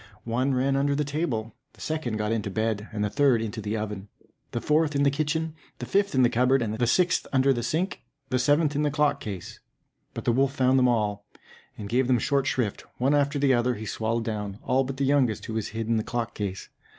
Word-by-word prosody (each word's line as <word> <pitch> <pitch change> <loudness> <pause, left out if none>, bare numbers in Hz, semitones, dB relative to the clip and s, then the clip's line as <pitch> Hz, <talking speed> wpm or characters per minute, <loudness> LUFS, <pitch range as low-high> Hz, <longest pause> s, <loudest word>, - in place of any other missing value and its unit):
One 130 +4 0
ran 135 +2 +1
under 140 +1 +1
the 150 - +1
table, 140 -7 -2 0.2
the - - -22
second 155 -8 -2
got 105 0 -1
into 110 -2 -1
the - - -9
bed, 110 -1 -1
the 105 -1 -1
third 135 +1 +3
into 110 0 -4
the 105 +2 -2
oven, 105 -2 -5 0.4
the 120 - -3
fourth 150 +2 +1
in 140 - +2
the 140 - +4
kitchen, 155 +2 -1 0.2
the - - -5
fifth 200 -4 +1
in 130 - +5
the - - +6
cupboard, 130 +2 +3 0.2
the 120 - +2
sixth 175 +7 +2
under 135 0 +4
the 120 - -2
sink, 165 - -2 0.3
the 130 - +1
seventh 145 +3 +2
in 145 - +1
the 150 - +2
clock 145 +1 +1
case. 100 -5 -7 0.6
But - - -6
the - - +3
wolf 135 +3 +1
found 130 0 +3
them 125 - +4
all, 105 -4 0 0.5
and 105 - -6
gave 125 +3 +1
them 125 -1 +4
short 140 +3 +1
shrift; 115 -6 -1
one 135 +4 +2
after 145 0 +2
the 140 -1 +3
other 120 0 +1
he 110 +1 -7
swallowed 115 +2 -1
down, 105 -3 -4
all 130 +1 +2
but 135 0 -5
the 140 - +1
youngest, 135 -6 +2
who 110 - -5
was 110 -2 -2
hid 115 +1 -4
in 115 0 +2
the 110 - 0
clock 120 0 -3
case. 100 -2 -5
125 Hz, 235 wpm, -26 LUFS, 110-140 Hz, 0.6 s, the